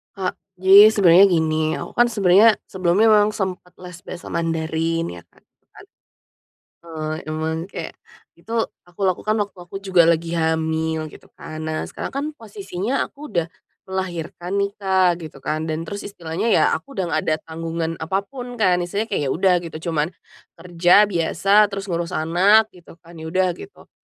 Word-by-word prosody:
Kak, 185 -2 -3 0.2
jadi 200 +3 +8
sebenarnya 190 -3 +6
gini, 155 -2 +1
aku - - -8
kan 240 0 +4
sebenarnya 205 +1 +5
sebelumnya 185 +3 +2
memang 210 -1 +5
sempet 185 -3 -4
les 180 -1 -10
bahasa 175 - -9
Mandarin 165 0 -1
ya 85 -1 -9
Kak, 85 - -28 0.3
kan. - - -15 1.0
Eee, 155 -2 -5
emang 160 +1 -3
kayak, 195 - -8 0.4
itu, 225 - -9 0.3
aku 175 +2 -14
lakukan 195 +3 0
waktu 205 -1 -5
aku 180 +2 -9
juga 185 -4 +4
lagi 170 0 +1
hamil, 160 -1 -1
gitu - - -16
kan. 155 0 -8
Nah 155 0 -2
sekarang - - -6
kan, 275 +2 -2
posisinya 205 +2 -4
aku - - -25
udah 170 -2 0 0.4
melahirkan 180 -1 -4
nih 200 - 0
Kak, 190 -3 +2
gitu 135 -3 -12
kan, 155 +2 -2
dan 160 0 -3
terus 205 0 -6
istilahnya 180 +3 -2
ya - - +4
aku 275 - -15
udah 185 -6 -2
nggak - - 0
ada 155 - +2
tanggungan 165 0 -4
apapun 200 +9 -4
kan, 185 -7 +2
istilahnya 205 +6 -3
kek 200 - -1
ya 135 - -1
udah 185 0 +3
gitu, 160 +1 -6
cuman, 160 +2 -1 0.4
kerja 180 +4 +3
biasa 195 +4 +3
terus 195 0 -5
ngurus 170 +1 -3
anak 190 +7 +3
gitu 175 -2 -16
kan, 170 0 -15
ya 160 - -8
udah 185 +3 +1
gitu. 405 - -13
175 Hz, 165 wpm, -21 LUFS, 160-200 Hz, 1.0 s, jadi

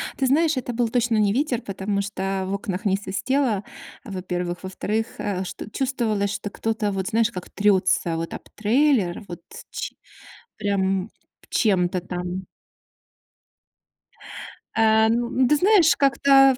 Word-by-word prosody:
Ты 270 - 0
знаешь, 310 +2 +3
это 245 -1 -3
был 235 0 +1
точно 235 -1 +1
не 205 -2 +3
ветер, 255 -2 0
потому 200 0 -2
что 195 -1 -2
в 195 - -2
окнах 200 0 -3
не 195 -2 +3
свистело, 210 +3 0 0.4
во-первых. 180 -5 -4
Во-вторых, 210 +4 -2
э, 195 -2 -2
ш 185 - -6 0.2
чувствовалось, 225 -7 0
что 205 - -4
кто-то 220 0 -1
вот 190 -1 -2
знаешь, 230 +1 +2
как 180 - -7
трётся 185 -4 +2
вот 165 0 -4
об - - -8
трейлер, 225 -4 +2
вот 175 - -8 0.3
ч - - -4 0.6
прям 195 -1 0 0.4
чем-то 180 -4 +2
там. 180 +1 -5 2.3
Э-э, 220 0 +4
ну 235 +1 +1
ну 255 0 +2
ты 300 - +4
знаешь, 345 -3 +5
как-то 275 -1 +5
210 Hz, 140 wpm, -24 LUFS, 190-245 Hz, 2.3 s, знаешь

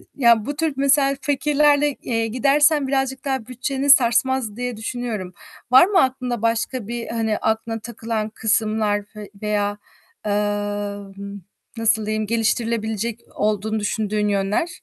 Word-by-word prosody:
ya 235 -4 +4
bu 290 - -3
tür 315 -1 0
mesela 275 0 +3
fikirlerle, 290 +1 +2
eee, 230 -2 -1
gidersen 280 +4 +3
birazcık 270 0 -1
daha 265 -5 -1
bütçeni 270 +3 -3
sarsmaz 240 -3 +4
diye 245 -2 -3
düşünüyorum. 220 -5 -4 0.4
Var 260 +6 +8
mı 385 -1 +3
aklında 255 -3 -2
başka 230 0 -1
bir, 235 0 -4
hani, 225 -2 -1
aklına 225 +1 -1
takılan 225 -1 -4
kısımlar 215 -1 0
ve 210 -1 -9
veya, 205 -1 -1 0.5
eee, 210 - 0 1.5
nasıl 225 -1 +2
diyeyim 215 0 -1
geliştirilebilecek 225 0 -1 0.2
olduğunu 215 +1 0
düşündüğün 210 0 -1
yönler? 200 - 0
230 Hz, 125 wpm, -22 LUFS, 215-265 Hz, 1.5 s, Var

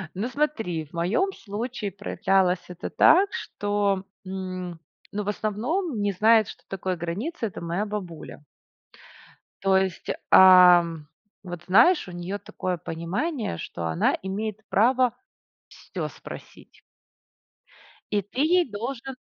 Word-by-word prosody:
Ну 210 +5 -2
смотри, 225 - -1
в 150 - -26
моём 195 - 0
случае 215 - -5
проявлялось 190 -1 +1
это 180 -1 -6
так, 385 +5 +5
что, 205 - -1 0.2
м 185 -2 -5 0.3
ну 210 +1 -2
в 205 - -3
основном 230 - -2
не 205 0 +1
знает, 215 +3 +4
что - - -11
такое 185 -1 -3
граница- 205 - -4
это 200 - -8
моя 170 +5 -2
бабуля. 180 -8 -7 1.2
То 195 -1 +4
есть, 190 -3 -2 0.2
ам 175 -4 +7 0.4
вот 175 -2 -7
знаешь, 230 - +5
у - - -8
неё 175 +3 -4
такое 185 -2 -4
понимание, 180 - -3
что 85 0 -6
она 80 0 +1
имеет 210 +3 -4
право 245 +3 +3 0.6
всё - - -6
спросить. - - -12 1.3
И 205 - +2
ты 205 +7 -4
ей 345 0 +3
должен 240 +5 -5
200 Hz, 125 wpm, -25 LUFS, 180-230 Hz, 1.3 s, ам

